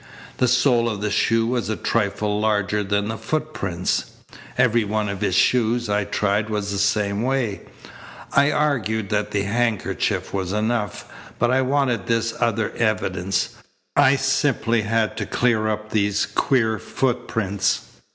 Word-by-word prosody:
The 125 - +2
sole 120 -1 +3
of 105 -3 -4
the 105 0 -2
shoe 115 +2 +2
was 120 -2 -1
a 110 - 0
trifle 105 -1 -1
larger 105 -1 +1
than 100 +1 0
the 110 0 -4
footprints. 125 - -2 0.5
Every 115 0 +3
one 105 0 -1
of 100 0 -4
his 95 -4 +1
shoes 120 +2 +2
I 105 0 +1
tried 105 +1 0
was 105 -2 -2
the 100 - -2
same 100 0 +1
way. 125 -5 -1 0.7
I 140 +1 +4
argued 110 -9 0
that 105 0 0
the 100 -1 -1
handkerchief 115 +1 -1
was 95 -1 -2
enough, 105 0 -1 0.3
but 120 0 +2
I 130 +1 +3
wanted 130 -5 0
this 115 0 +1
other 115 -2 0
evidence. 95 -4 0 0.5
I 140 -1 +5
simply 135 -4 +1
had 110 0 0
to - - -3
clear 115 -3 +1
up 110 0 -3
these 100 -1 +1
queer 110 -5 +1
footprints. 115 -6 -1
110 Hz, 150 wpm, -22 LUFS, 105-120 Hz, 0.7 s, I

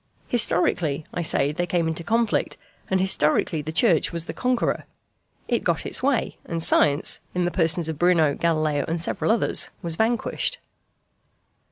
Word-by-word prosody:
Historically, 165 - 0
I 175 - -2
say, 145 -3 +1
they 175 +3 -2
came 170 -1 0
into 160 +1 -3
conflict, 225 +4 0 0.3
and 190 - +1
historically 160 -4 +1
the 155 +2 -5
Church 170 -1 +2
was 170 -1 -4
the - - -6
conqueror. 250 -1 -1 0.6
It - - 0
got - - 0
its - - 0
way; 265 -3 0
and 165 -1 -2
science, 145 -1 +3 0.2
in 180 -1 +1
the 175 - -1
persons 165 -2 +2
of 160 -2 -5
Bruno, 170 -4 +3
Galileo, 155 -3 0
and 165 +1 -2
several 165 - -2
others, 230 - +1
was 165 -1 -3
vanquished. 225 +1 0
170 Hz, 160 wpm, -24 LUFS, 155-190 Hz, 0.6 s, science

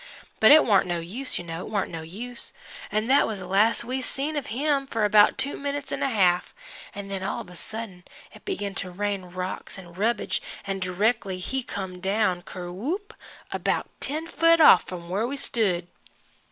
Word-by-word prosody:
But 220 - +7
it 310 +1 +8
warn't 200 -5 +4
no 175 -1 -1
use, 220 +11 -2
you - - -4
know, 165 0 -5
it - - -8
warn't 205 -3 -1
no 165 -1 -5
use. 230 +10 -6 0.4
An' 215 +1 +1
that 270 +4 +4
was 215 - -3
the 185 - -7
last 205 +6 +3
we 255 +2 -2
see 285 +4 -2
of 290 - -2
him 275 +3 0
for 225 -4 0
about 210 0 +6
two 280 - 0
minutes 285 -1 -4
'n' - - -3
a 275 - +2
half, 180 -6 +2 0.4
an' 200 -1 -6
then 195 -1 -4
all 190 - -2
of 185 -5 -12
a - - -12
sudden 205 -2 -7 0.3
it - - -15
begin 205 - -3
to 190 -1 -2
rain 200 +1 -2
rocks 185 +2 -5
and 175 -3 -12
rubbage 230 - 0 0.2
an' 195 -1 -2
directly 195 +2 0
he 260 +9 -2
come 190 -6 -6
down 190 -1 +1
ker 175 0 -7
whoop 350 - -4 0.4
about - - -1
ten 310 +3 -1
foot 330 0 +4
off 315 - +8
f'm 175 -2 -7
where 200 +6 0
we 280 +2 -4
stood. 195 -10 +1
205 Hz, 200 wpm, -26 LUFS, 185-260 Hz, 0.4 s, it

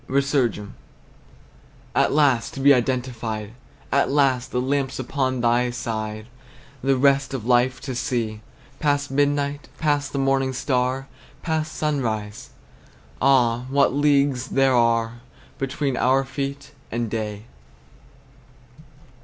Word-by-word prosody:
RESURGAM. 130 -7 0 1.2
At - - +3
last 140 -6 +2
to - - -6
be 140 +1 +6
identified! 120 -4 -2 0.4
At 140 - +2
last, 130 -3 +2
the 125 - 0
lamps 135 +1 -1
upon 130 -1 -1
thy 120 +1 +2
side, 110 -3 -4 0.6
The 135 0 +2
rest 140 0 +2
of 115 -4 -5
life 125 +1 +2
to 135 -1 -5
see! 120 -3 -2 0.4
Past 145 -1 0
midnight, 145 +1 0
past 145 -2 0
the - - -4
morning 135 -1 +1
star! 130 +1 -1 0.4
Past 160 -1 -2
sunrise! 120 -6 -2 0.7
Ah! 125 -2 +3
what 140 -1 +3
leagues 140 -2 +2
there 135 0 +2
are 115 -1 +1 0.4
Between 135 0 -1
our 130 +2 +3
feet 140 +2 -5 0.2
and 120 0 -1
day! 105 -1 -4
130 Hz, 115 wpm, -23 LUFS, 120-140 Hz, 1.2 s, be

